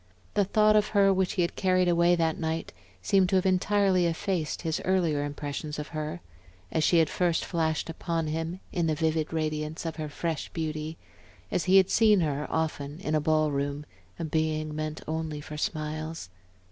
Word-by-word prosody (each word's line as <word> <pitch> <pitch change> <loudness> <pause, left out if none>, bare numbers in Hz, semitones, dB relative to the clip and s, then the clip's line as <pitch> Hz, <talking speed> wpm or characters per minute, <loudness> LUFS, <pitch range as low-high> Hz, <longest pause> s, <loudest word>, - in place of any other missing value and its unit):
The 205 - +3
thought 215 +2 +4
of 210 0 +4
her 195 -1 +6
which 190 -1 0
he 180 - +1
had 170 - -2
carried 185 -1 +2
away 170 0 +4
that 165 -2 0
night 160 0 -3 0.3
seemed 190 - +3
to 190 - +2
have 185 - +2
entirely 190 -1 +3
effaced 170 -1 -2
his 160 -2 -1
earlier 170 -6 +1
impressions 145 +1 -4
of 150 0 -5
her, 150 - -4 0.5
as 160 - +1
she 170 - +4
had 160 -1 +5
first 175 +1 0
flashed 160 -3 -1
upon 165 0 -2
him 165 +4 -3
in 170 -2 0
the 155 - +1
vivid 160 0 0
radiance 155 0 -2
of 165 -1 -4
her 155 -1 -4
fresh 160 +1 -3
beauty, 155 -1 -3 0.5
as - - 0
he 190 +1 +6
had 190 -1 +4
seen 215 -4 +5
her 150 -2 -1
often 155 -2 -2
in 155 - -2
a 155 - +2
ball 155 0 +2
room, 140 +1 -2 0.3
a 165 - -3
being 155 -1 -1
meant 155 0 -4
only 160 -1 -3
for 150 +1 -8
smiles. 155 - -3
160 Hz, 185 wpm, -28 LUFS, 155-180 Hz, 0.5 s, her